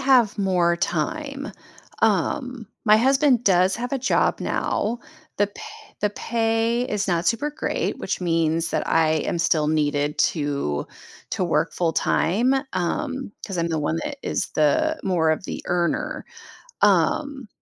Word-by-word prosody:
have 255 -6 +4
more 180 -3 +2
time. 280 - -3 0.5
Um, 255 -5 0 0.2
my 215 -1 +6
husband 265 +1 +3
does 185 0 +3
have 245 +3 -5
a 275 - +1
job 260 - +1
now, 230 +3 -1 0.4
the 205 - +3
pa 205 - -12 0.4
the 210 - +2
pay 225 +2 0
is 205 -1 -1
not 175 -2 0
super 265 +6 +1
great, 300 - -2
which - - -3
means 165 -1 +1
that - - -1
I 160 -1 +3 0.2
am - - -1
still 160 -2 +2
needed 150 -1 0
to 140 - 0 0.5
to - - 0
work - - 0
full 170 -2 0
time, 230 +12 +2 0.2
um, 260 - -2 0.2
'cause 195 -4 -5
I'm 170 0 0
the 160 -1 -1
one 150 +2 -1
that 285 - -4
is - - -2
the 315 - +2
more 170 -4 +2
of 155 +4 -1
the - - -5
earner, 180 - -1 0.6
um, 280 -5 +2
200 Hz, 150 wpm, -23 LUFS, 165-255 Hz, 0.6 s, my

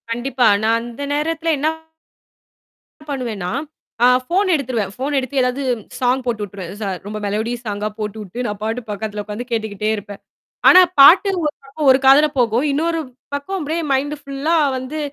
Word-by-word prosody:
கண்டிப்பா 245 +2 +1 0.2
நான் 225 +1 +3
அந்த 240 +4 -7
நேரத்தில 325 +2 0
என்ன 290 +3 0 1.4
பண்ணுவேன்னா, 230 -10 -3 0.5
அ - - +8 0.2
ஃபோன் 375 +6 +1
எடுத்துருவேன். 240 -8 -2
ஃபோன் 280 +3 -2
எடுத்து 270 +1 -1
ஏதாவது 250 +2 -1 0.4
சாங் 255 +1 +1
போட்டு 230 -4 -2
விட்டுருவேன். 190 -3 -7
ச - - -2 0.2
ரொம்ப 215 +1 -5
மெலோடிஸ் 225 +4 -3
சாங்கா 205 +1 -2
போட்டுவிட்டு 215 +2 -5
நான் 205 -1 -5
பாட்டுக்கு 225 +1 -4
பக்கத்தில 210 0 -4
உட்காந்து 210 +4 -6
கேட்டுக்கிட்டே 215 -2 -2
இருப்பேன். 205 -1 -9 0.5
ஆனா, 370 - +9 0.2
பாட்டு 350 +8 +8
ஒரு 300 -1 0
பக்கம் 275 +1 0
ஒரு 260 - +4
காதில 280 +3 +7
போகும். 240 +3 +2
இன்னொரு 330 +3 0 0.4
பக்கம் 335 +8 -4
அப்பிடியே 320 +1 -2
மைண்ட் 290 +3 -1
ஃபுல்லா 280 +4 -1 0.2
வந்து 265 +5 -6
250 Hz, 155 wpm, -19 LUFS, 215-285 Hz, 1.4 s, ஆனா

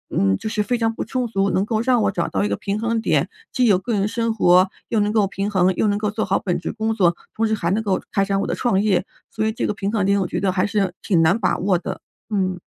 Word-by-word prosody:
嗯， 95 -1 +3
就 - - -6
是 215 - -1
非 245 +3 0
常 225 -1 0
不 - - -3
充 255 -2 -2
足， 200 -3 0
能 190 +2 +1
够 220 0 0
让 245 -1 +2
我 200 - +2
找 175 -3 -1
到 95 +1 -1
一 - - +1
个 100 - -1
平 200 - -3
衡 230 0 0
点， - - +1 0.2
既 250 -2 +2
有 200 -5 +5
个 230 +4 -3
人 200 -1 +1
生 230 +1 -1
活 185 -3 +4 0.2
又 225 - +1
能 205 0 +1
够 215 -2 +3
平 200 +1 -3
衡， 185 -1 +3
又 215 - +1
能 205 - +1
够 210 -1 0
做 215 +1 -2
好 195 - +1
本 180 -3 -1
职 - - -4
工 220 0 -1
作， 175 -5 +3 0.2
同 225 0 +1
时 220 - 0
还 170 -5 -2
能 220 +3 +1
够 195 -3 0
开 195 - +2
展 195 0 0
我 - - -2
的 - - -1
创 210 -6 +1
业， 190 -4 +1 0.3
所 215 - -2
以 220 - +1
这 220 - -3
个 - - -1
平 200 0 -2
衡 215 -3 0
点 200 +1 +2
我 - - 0
觉 - - -3
得 195 -2 +1
还 185 +1 +1
是 200 -3 0
挺 175 -6 +2
难 170 +6 +4
把 190 - +1
握 185 -1 +2
的， 170 - -6 0.3
嗯。 185 -2 0
200 Hz, 320 characters per minute, -21 LUFS, 185-220 Hz, 0.3 s, 有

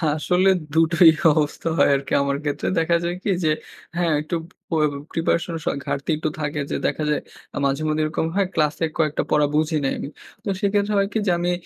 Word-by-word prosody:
আসলে 180 +4 +2 0.2
২ 160 - +3
টোই 170 0 +8 0.2
অবস্থা 150 +2 -1
হয় - - +5
আরকি 140 - -4
আমার 140 0 0
ক্ষেত্রে। 145 -1 -2
দেখা 165 +1 +2
যায় 175 +1 -1
কি? - - -1
যে 155 - +3 0.5
হ্যাঁ, 170 -2 +1
একটু 155 +3 -3 0.3
পো 165 - -1 0.4
প্রিপারেশনের 165 0 -1
স - - -6 0.2
ঘাটতি 140 - -3
একটু 155 0 -1
থাকে, 150 0 -2
যে - - 0
দেখা 155 - -2
যায় 150 - +1 0.3
আ - - -3
মাঝে-মধ্যে 155 +3 0
এরকম 155 +1 -1
হয়, 200 -2 +2
ক্লাসে 155 +1 +1
কয়েকটা 155 -2 +1
পড়া 150 -1 +4
বুঝি 155 +1 +1
নাই 135 - +1
আমি। - - -5 0.3
তো 215 - -3
সেক্ষেত্রে 205 +1 +1
হয় 195 0 +2
কি? 220 - +1
যে, - - +4
আমি 175 +1 0
160 Hz, 200 wpm, -22 LUFS, 150-175 Hz, 0.5 s, টোই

